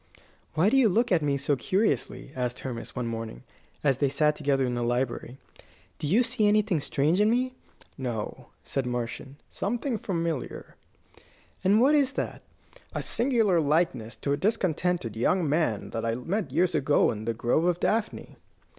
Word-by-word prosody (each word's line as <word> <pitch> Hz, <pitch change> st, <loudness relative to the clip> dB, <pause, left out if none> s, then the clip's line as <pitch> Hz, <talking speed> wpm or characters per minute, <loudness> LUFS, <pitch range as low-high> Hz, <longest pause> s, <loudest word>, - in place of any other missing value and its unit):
"Why 180 Hz, +7 st, +3 dB
do 270 Hz, -, +4 dB
you 250 Hz, -5 st, +5 dB
look 230 Hz, +5 st, +1 dB
at 175 Hz, -3 st, +4 dB
me 140 Hz, -2 st, +1 dB
so 140 Hz, +1 st, +1 dB
curiously?" 185 Hz, -, -1 dB
asked 125 Hz, -1 st, -3 dB
Hermas, 120 Hz, -3 st, -6 dB
one 125 Hz, -, -2 dB
morning, 115 Hz, -, -5 dB, 0.4 s
as 135 Hz, -3 st, +2 dB
they 140 Hz, -, +2 dB
sat 150 Hz, +2 st, +2 dB
together 140 Hz, -3 st, +1 dB
in 125 Hz, -, -2 dB
the 120 Hz, -, -2 dB
library. 120 Hz, +1 st, -2 dB, 0.6 s
"Do 150 Hz, -, -2 dB
you 215 Hz, +11 st, +4 dB
see 230 Hz, -3 st, +2 dB
anything 210 Hz, -4 st, +3 dB
strange 150 Hz, +6 st, +1 dB
in 210 Hz, -, +4 dB
me?" 255 Hz, +2 st, +1 dB, 0.5 s
"No," 120 Hz, -5 st, -4 dB, 0.2 s
answered 135 Hz, -2 st, -2 dB
Marcion; 125 Hz, +2 st, -4 dB
"something 240 Hz, +2 st, -2 dB
familiar." 165 Hz, -7 st, -3 dB, 0.9 s
"And 200 Hz, +3 st, +4 dB
what 270 Hz, +5 st, +5 dB
is 280 Hz, -3 st, +3 dB
that?" -, -, -4 dB, 0.5 s
"A -, -, -2 dB
singular 230 Hz, -8 st, +2 dB
likeness 145 Hz, -7 st, 0 dB
to 140 Hz, -, -1 dB
a -, -, 0 dB
discontented 180 Hz, -, 0 dB
young 165 Hz, +9 st, +1 dB
man 145 Hz, -8 st, 0 dB
that 115 Hz, -, -3 dB
I 115 Hz, 0 st, 0 dB
met 170 Hz, -, -2 dB
some 130 Hz, -, -10 dB
years 180 Hz, 0 st, +3 dB
ago 145 Hz, -1 st, +3 dB
in 110 Hz, 0 st, -6 dB
the 115 Hz, 0 st, -1 dB
Grove 120 Hz, +8 st, +1 dB
of 175 Hz, -1 st, +1 dB
Daphne." 220 Hz, 0 st, -1 dB
150 Hz, 170 wpm, -27 LUFS, 125-205 Hz, 0.9 s, you